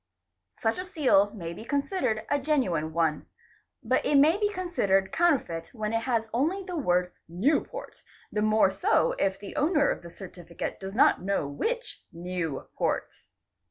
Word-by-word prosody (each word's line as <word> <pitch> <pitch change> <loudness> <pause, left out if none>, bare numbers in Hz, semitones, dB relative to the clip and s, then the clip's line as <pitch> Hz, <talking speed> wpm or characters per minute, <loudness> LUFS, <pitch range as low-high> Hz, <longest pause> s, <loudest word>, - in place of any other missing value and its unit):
Such 225 +9 +1
a 365 - -4
seal 275 - +3
may 170 -4 -5
be 195 - -9
considered 260 - -1
a 285 - +3
genuine 220 - 0
one; 160 -2 0 0.6
but - - +1
it 295 - +1
may 300 +4 +6
be 415 -1 +2
considered 200 - 0
counterfeit 255 - 0
when 215 -1 -3
it 225 0 0
has 225 -2 +1
only 325 +11 0
the 365 -1 -6
word 180 - +1 0.2
'* - - -37 0.2
Newport'',—the 305 - -2
more 215 -2 +4
so 195 - +2
if 195 0 0
the 200 - -9
owner 295 -1 +3
of - - -4
the 170 - -10
certificate 175 -2 -7
does 190 +1 -7
not 255 - +4
know 195 -6 -1
which 470 - -3
New 170 -4 -4
port. - - -1
220 Hz, 160 wpm, -27 LUFS, 180-300 Hz, 0.6 s, may